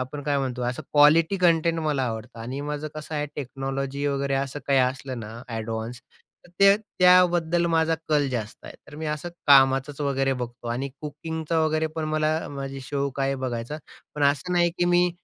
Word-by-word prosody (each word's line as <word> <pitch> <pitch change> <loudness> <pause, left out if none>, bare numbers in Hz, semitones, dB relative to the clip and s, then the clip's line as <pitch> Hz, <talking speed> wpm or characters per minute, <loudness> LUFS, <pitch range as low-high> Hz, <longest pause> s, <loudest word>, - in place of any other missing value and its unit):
आपण 130 +3 -5
काय 145 0 0
म्हणतो, 130 -2 -3
असं 125 +1 -2
क्वालिटी 155 +5 +5
कंटेंट 165 -2 +3
मला 150 -4 0
आवडतं. 115 0 -5
आणि 125 +5 -5
माझं 150 +1 -4
कसं 155 +1 -7
आहे 150 0 -1
टेक्नॉलॉजी 135 +1 -3
वगैरे 140 -1 0
असं 135 +1 -2
काही 135 -1 +3
असलं 130 0 -1
ना 110 0 -8
अ‍ॅडवान्स, 115 +1 -4 0.5
तर - - -21
ते 200 0 +7
त्याबद्दल 175 -4 +3
माझा 165 -1 +2
कल 145 -3 +2
जास्त 115 -3 -5
आहे. - - -9
तर - - -13
मी 155 0 -5
असं 150 +3 -3 0.2
कामाचंच 135 0 +5
वगैरे 135 -1 +1
बघतो. 120 -1 -6
आणि 125 +4 -2
कुकिंगचा 160 +2 -3
वगैरे 155 0 +1
पण 160 - -1
मला 155 0 +1 0.2
माझी 135 -1 -6
शौक 140 0 -3
आहे 135 0 +1
बघायचा. 130 +2 -4 0.4
पण 150 - -3
असं 145 +6 +1
नाही, 175 -1 +3
की 175 - +3
मी 175 0 +3
145 Hz, 180 wpm, -25 LUFS, 130-160 Hz, 0.5 s, ते